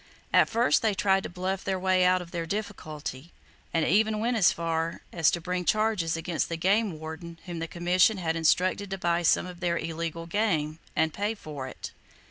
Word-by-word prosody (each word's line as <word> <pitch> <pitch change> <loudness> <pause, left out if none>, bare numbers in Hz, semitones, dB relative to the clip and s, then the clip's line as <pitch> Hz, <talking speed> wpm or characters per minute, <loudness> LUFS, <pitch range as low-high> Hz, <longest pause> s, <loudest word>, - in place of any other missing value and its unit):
At - - +5
first 230 +2 +3
they 220 -3 +1
tried 195 0 +3
to - - -6
bluff 185 +2 -3
their 190 - -1
way 185 0 +3
out 180 0 +3
of 170 - -15
their 170 -2 -3
difficulty, 160 -7 -5 0.4
and 165 -1 +1
even 215 +5 +3
went 235 +3 0
as 200 -6 +5
far 165 0 -2
as 165 -3 +4
to 175 - -1
bring 180 +1 -2
charges 210 -5 +1
against 165 0 -2
the 165 - -2
game 195 +1 +1
warden 160 +2 -8
whom 175 -2 -5
the 165 - -3
Commission 180 +5 +3
had 165 -3 -1
instructed 185 +5 +2
to 195 - -3
buy 170 -1 +1
some 170 - +3
of 180 -1 -9
their 175 -2 0
illegal 165 0 -4
game, 165 -5 0 0.2
and 160 -1 +1
pay 205 +3 -1
for 145 -9 -7
it. - - -8
175 Hz, 200 wpm, -27 LUFS, 165-195 Hz, 0.4 s, At